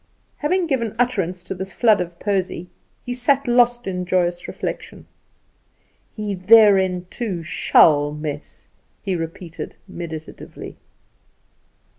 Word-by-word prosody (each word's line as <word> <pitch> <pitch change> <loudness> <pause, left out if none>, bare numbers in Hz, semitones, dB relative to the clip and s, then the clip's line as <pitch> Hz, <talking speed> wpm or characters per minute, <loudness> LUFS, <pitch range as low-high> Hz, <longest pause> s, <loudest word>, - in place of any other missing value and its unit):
Having 360 +4 +1
given 235 -8 -1
utterance 190 -8 -1
to - - -5
this 190 0 -7
flood 220 -5 +4
of 170 -1 -6
poesy, 185 -3 -2 0.4
he 245 - -3
sat 270 +2 +1
lost 240 0 +3
in 180 -1 -3
joyous 175 -1 0
reflection. - - -6 1.1
"He 210 -2 -3
therein, 190 -2 +5
too, 195 -8 -4
shall 145 -2 +4
mess," 150 -1 -7 0.4
he 195 -2 -1
repeated 165 0 -6
meditatively. 160 -4 -8
190 Hz, 110 wpm, -21 LUFS, 175-230 Hz, 1.1 s, therein